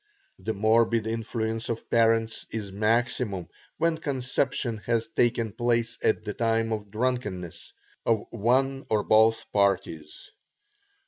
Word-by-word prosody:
The 110 - -3
morbid 110 +2 +3
influence 115 0 -3
of 115 -1 -4
parents 115 -1 +2
is 105 -3 -5
maximum 110 -2 0 0.3
when 165 -1 +1
conception 130 -4 -1
has 115 -1 +1
taken 115 -2 +1
place 120 +1 0
at - - +2
the 105 - -4
time 115 0 +1
of 105 -2 -5
drunkenness 105 -6 -3 0.3
of 110 -3 +1
one 130 +5 +1
or 105 -1 +2
both 110 +1 +4
parties. 95 -6 -1
115 Hz, 120 wpm, -27 LUFS, 105-120 Hz, 0.3 s, both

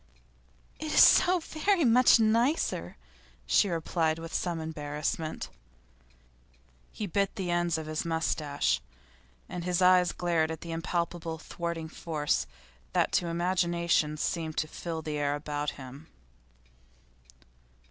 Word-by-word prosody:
'It 310 -1 -4
is - - +8
so 365 +1 +6
very 335 +2 +1
much 245 0 +6
nicer,' 230 +7 +1 0.5
she 205 - +3
replied 165 -1 0
with 165 +1 -8
some 175 -2 -1
embarrassment. 155 - -4 1.4
He 215 - -4
bit 200 +1 -1
the 185 -5 -3
ends 175 -1 +1
of 160 - -5
his 155 0 -3
moustache, 155 - 0 0.7
and 175 - -5
his 180 0 0
eyes 180 -1 +5
glared 170 -3 0
at 160 -1 -5
the 170 - -7
impalpable 170 0 -3
thwarting 170 0 -5
force 150 - -2 0.5
that - - +2
to 175 - +1
imagination 170 -3 +1
seemed 160 0 -2
to 155 - 0
fill 160 0 -5
the 150 -1 -3
air 145 0 0
about 145 0 -3
him. 135 +3 -10
165 Hz, 125 wpm, -29 LUFS, 155-180 Hz, 1.4 s, is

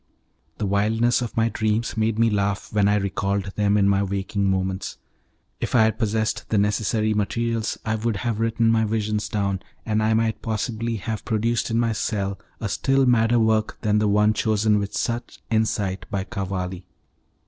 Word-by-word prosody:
The 105 - -2
wildness 110 +5 +2
of 120 -2 -5
my 115 0 +3
dreams 110 0 -1
made 110 0 0
me 115 0 +3
laugh 100 0 -1
when 105 -1 +3
I 105 - +3
recalled 100 0 -1
them 105 0 +2
in 100 -1 +4
my 100 0 +3
waking 100 0 -1
moments. 95 0 -2 0.6
If - - -2
I 115 - +6
had 110 0 +1
possessed 110 -1 -1
the 110 - +1
necessary 105 +1 +1
materials 115 +2 -1
I 110 - 0
would 110 0 -1
have 110 +2 -2
written 115 0 +2
my 110 -1 +3
visions 105 -1 -1
down, 100 -2 -1 0.3
and 110 -1 +1
I 110 +1 +2
might 110 0 0
possibly 115 +1 -2
have 110 +1 -4
produced 115 +1 0
in 115 0 +1
my 115 -1 +2
cell 100 -2 -2 0.2
a 110 - -2
still 135 +6 +2
madder 120 -1 +3
work 110 -1 +1
than 105 0 +2
the 105 - +2
one 105 +1 +4
chosen 110 0 +2
with 100 0 -3
such 120 0 -3
insight 100 -4 0
by 100 -2 -2
Cavalli. 95 -3 -4
110 Hz, 180 wpm, -23 LUFS, 100-115 Hz, 0.6 s, I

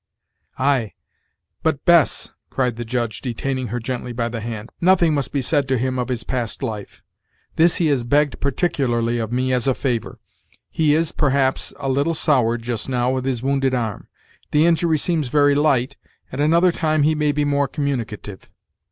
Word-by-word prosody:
"Ay! 130 -6 +1 0.7
but, 155 -3 -1
Bess," 170 -4 +4 0.2
cried 125 -3 -1
the 120 - -5
judge, 120 -1 -3
detaining 130 +1 -3
her 120 +3 -3
gently 125 +1 -4
by 115 0 -1
the 115 -1 -5
hand, 110 0 -6
"nothing 175 -3 +4
must 140 -3 -1
be 140 -2 -1
said 145 +1 +1
to 130 -1 +1
him 130 +1 -1
of 125 - -1
his 125 -3 -3
past 120 -1 -3
life. 110 -5 -6 0.5
This 165 +1 +4
he 170 - +1
has 135 -4 +1
begged 145 +4 +1
particularly 130 -6 0
of 110 -1 -3
me, 130 +1 0
as 125 +1 0
a 130 - +2
favor, 120 -5 -2 0.5
He 150 -2 +2
is, 160 0 +1
perhaps, 135 -2 +1
a 135 - -4
little 140 +5 +1
soured, 120 -7 +1
just 120 0 -4
now, 125 -1 +1
with 130 0 -2
his 130 -3 -2
wounded 135 -1 +1
arm; 115 -5 -3 0.4
the 150 +2 +3
injury 165 -1 +3
seems 155 -2 0
very 145 +2 +3
light, 140 -2 +1 0.3
and 130 - -3
another 170 +4 +4
time 155 -2 +1
he 155 +2 +3
may 150 -1 +1
be 145 0 0
more 140 -1 +1
communicative." 115 -9 -4
135 Hz, 180 wpm, -21 LUFS, 120-150 Hz, 0.7 s, Bess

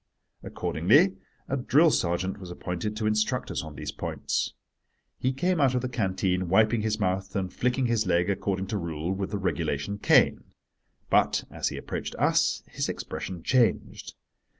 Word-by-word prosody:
Accordingly 145 - +2 0.3
a 135 - -1
drill 145 +5 +4
sergeant 90 0 0
was 90 -2 -9
appointed 90 +4 -4
to 110 - -2
instruct 110 0 0
us - - -2
on 80 -1 -9
these - - -5
points. - - -3 0.6
He 130 - +1
came 170 +5 0
out 130 -2 +3
of 125 - +1
the 130 - -2
canteen, 95 -5 -1
wiping 110 +4 +4
his 105 0 -1
mouth 95 -1 -1
and 95 -2 -2
flicking 125 +1 0
his 115 -4 +1
leg, 90 0 +2
according 95 -1 -1
to 105 - -1
rule, 85 0 -3
with 95 0 -3
the 105 - -2
regulation 90 -1 -2
cane. - - +4 0.7
But, - - +3
as - - -2
he - - -6
approached - - -5
us, - - +2
his - - -3
expression 90 -3 -5
changed. 125 -3 +1
100 Hz, 165 wpm, -27 LUFS, 90-120 Hz, 0.7 s, drill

